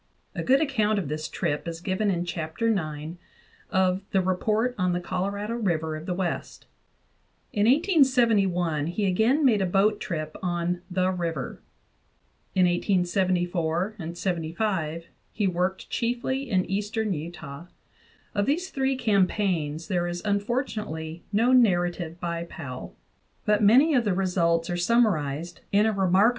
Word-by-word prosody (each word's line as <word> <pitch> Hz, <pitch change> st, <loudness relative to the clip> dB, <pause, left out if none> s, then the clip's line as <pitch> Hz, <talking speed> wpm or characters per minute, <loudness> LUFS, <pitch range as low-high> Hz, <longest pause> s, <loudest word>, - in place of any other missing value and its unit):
A -, -, -3 dB
good 270 Hz, +3 st, +3 dB
account 220 Hz, -8 st, +1 dB
of 180 Hz, -8 st, -2 dB
this 155 Hz, +1 st, -3 dB
trip 145 Hz, +3 st, -2 dB
is 165 Hz, -1 st, -4 dB
given 190 Hz, +3 st, 0 dB
in 175 Hz, -2 st, 0 dB
Chapter 170 Hz, +6 st, -2 dB
IX 155 Hz, -3 st, -3 dB, 0.5 s
of 190 Hz, 0 st, +2 dB
the 195 Hz, -, +2 dB
"Report 210 Hz, +6 st, +1 dB
on 180 Hz, -4 st, +1 dB
the 175 Hz, -, 0 dB
Colorado 200 Hz, +4 st, -3 dB
River 165 Hz, -9 st, -1 dB
of 155 Hz, +2 st, -8 dB
the 180 Hz, -, -1 dB
West." 180 Hz, -2 st, -3 dB, 0.9 s
In 205 Hz, +1 st, +2 dB
1871 230 Hz, -, +3 dB
he 200 Hz, +4 st, -1 dB
again 225 Hz, +10 st, +3 dB
made 220 Hz, -6 st, +4 dB
a 190 Hz, -, +1 dB
boat 200 Hz, +3 st, +2 dB
trip 155 Hz, -3 st, -4 dB
on 175 Hz, 0 st, -1 dB
"the 185 Hz, 0 st, +1 dB
river." 165 Hz, -7 st, -4 dB, 0.9 s
In 185 Hz, -1 st, +5 dB
1874 175 Hz, -2 st, +1 dB, 0.2 s
and 170 Hz, 0 st, -6 dB
1875 170 Hz, -2 st, -2 dB, 0.3 s
he 210 Hz, -, 0 dB
worked 185 Hz, +1 st, -1 dB
chiefly 245 Hz, +3 st, -1 dB
in 185 Hz, -4 st, +2 dB
eastern 210 Hz, +2 st, -1 dB
Utah. 160 Hz, -1 st, -7 dB, 0.7 s
Of 205 Hz, -1 st, 0 dB
these 350 Hz, +7 st, 0 dB
three 270 Hz, 0 st, 0 dB
campaigns 190 Hz, -, 0 dB
there 175 Hz, -3 st, 0 dB
is 175 Hz, 0 st, -4 dB
unfortunately 205 Hz, -, -2 dB
no 225 Hz, +4 st, +3 dB
narrative 175 Hz, -8 st, +2 dB
by 170 Hz, -1 st, -3 dB
Powell 140 Hz, -8 st, -8 dB, 0.2 s
;* -, -, -42 dB
but 210 Hz, 0 st, +3 dB
many 255 Hz, +10 st, +6 dB
of 245 Hz, -4 st, +3 dB
the 200 Hz, -3 st, +1 dB
results 170 Hz, -3 st, +1 dB
are 175 Hz, -, -1 dB
summarized 175 Hz, -, +1 dB
in 205 Hz, +2 st, +4 dB
a 220 Hz, -, +3 dB
re 190 Hz, -2 st, +1 dB
* -, -, +4 dB
F. 190 Hz, -, +6 dB
185 Hz, 150 wpm, -26 LUFS, 170-215 Hz, 0.9 s, many